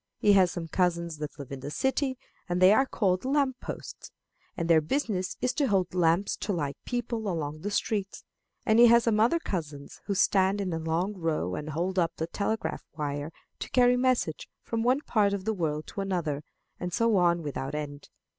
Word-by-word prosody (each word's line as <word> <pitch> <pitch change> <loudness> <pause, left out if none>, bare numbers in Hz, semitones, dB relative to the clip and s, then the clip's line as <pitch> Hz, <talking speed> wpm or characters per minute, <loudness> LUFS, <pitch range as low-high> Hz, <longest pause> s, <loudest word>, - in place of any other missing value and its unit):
He 205 - +4
has 185 -3 +5
some 170 -2 -5
cousins 170 -1 0
that 150 -1 -6
live 140 -2 -9
in 135 - -5
the 140 +2 -6
city, 265 - 0 0.3
and 175 0 0
they 185 +2 +7
are 265 +5 +3
called 185 -7 0
lamp 265 -1 +1
posts, - - -8 0.5
and 170 - -1
their 165 -2 +5
business 190 - -2
is 250 - +1
to 285 -3 +1
hold 190 -5 +1
lamps 175 +2 +2
to 205 - -3
light 145 -6 -2
people 235 -3 -3
along 155 -3 -3
the 205 - -3
streets; 205 -1 -2 0.4
and 220 +1 +4
he 240 - +9
has 235 0 +6
some 225 -2 +2
other 235 +10 +4
cousins 155 - -5
who 200 - 0
stand 190 +1 +3
in 185 -3 -2
a 165 - -2
long 165 +5 -1
row 160 - -1
and 150 +10 -4
hold 180 +5 -1
up 170 -1 0
the 160 - -2
telegraph 210 +6 -2
wire 145 0 -3 0.3
to - - -5
carry 250 -1 +4
messages 250 -10 0 0.2
from 230 -1 -2
one 255 +4 +2
part 210 -7 +2
of 200 -1 -3
the 220 - +1
world 155 -5 -2
to 200 - -5
another; 170 -7 -2 0.4
and 180 0 -4
so 230 0 +2
on 170 -2 +3
without 140 -1 -4
end. 145 -1 -6
185 Hz, 200 wpm, -28 LUFS, 160-220 Hz, 0.5 s, he